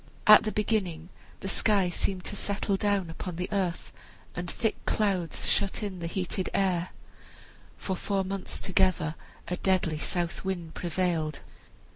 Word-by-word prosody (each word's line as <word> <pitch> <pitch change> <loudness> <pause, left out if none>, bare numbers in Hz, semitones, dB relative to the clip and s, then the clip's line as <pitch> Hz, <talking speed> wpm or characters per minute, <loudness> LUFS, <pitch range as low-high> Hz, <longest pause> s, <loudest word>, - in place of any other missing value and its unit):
At 215 0 +10
the 215 - 0
beginning 190 -7 -1 0.3
the - - -4
sky 195 -2 +3
seemed 185 +1 -1
to - - -4
settle 200 0 0
down 195 -4 +1
upon 175 +1 -5
the 180 +2 -2
earth, 190 -4 -1 0.4
and 175 0 -4
thick 225 -2 -1
clouds 190 -7 0
shut 200 +2 +1
in 195 -3 -4
the 170 - -3
heated 185 +1 -2
air. 185 -2 +1 0.9
For 190 - -2
four 195 +1 0
months 195 0 -5
together 185 -5 +2 0.3
a 180 +1 -2
deadly 180 -5 +1
south 175 +2 -1
wind 175 -4 -3
prevailed. 170 -3 -1
185 Hz, 145 wpm, -29 LUFS, 175-200 Hz, 0.9 s, At